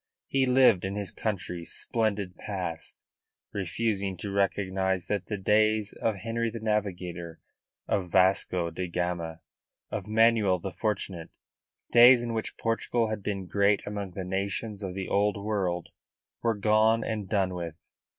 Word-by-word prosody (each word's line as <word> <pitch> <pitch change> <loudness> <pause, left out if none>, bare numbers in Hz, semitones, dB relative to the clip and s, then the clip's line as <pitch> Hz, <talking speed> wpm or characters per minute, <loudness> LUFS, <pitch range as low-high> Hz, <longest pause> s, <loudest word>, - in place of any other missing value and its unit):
He 135 -1 +1
lived 125 -7 +5
in 95 +1 -3
his 100 -3 -1
country's 90 -5 -3
splendid 105 -5 -1
past, 90 -6 -5 0.6
refusing 100 0 -1
to 100 +3 -5
recognise 95 -2 0
that 100 -2 -2
the 105 - -2
days 110 +1 +2
of 110 -2 -1
Henry 115 +3 -2
the 115 +1 -6
Navigator, 90 -6 -3 0.5
of 90 -3 -1
Vasco 90 -2 +3
da 90 +2 -4
Gama, 85 -2 -3 0.5
of 100 -2 -4
Manuel 110 -3 +4
the 95 +2 -5
Fortunate 95 -6 -3 0.6
days 120 +1 +8
in 120 -1 -3
which 110 -1 -3
Portugal 115 0 0
had 110 - -3
been 95 -1 -3
great 100 +2 +2
indeed - - -7
among 100 -2 -4
the 95 0 -5
nations 100 +3 -2
of 95 -2 -5
the 95 -1 -4
Old 105 +1 +2
World 100 -4 -2 0.5
were 115 -1 +1
gone 110 +2 +3
and 105 -4 -3
done 95 -3 +1
with. 85 -3 -5
100 Hz, 150 wpm, -28 LUFS, 90-110 Hz, 0.6 s, days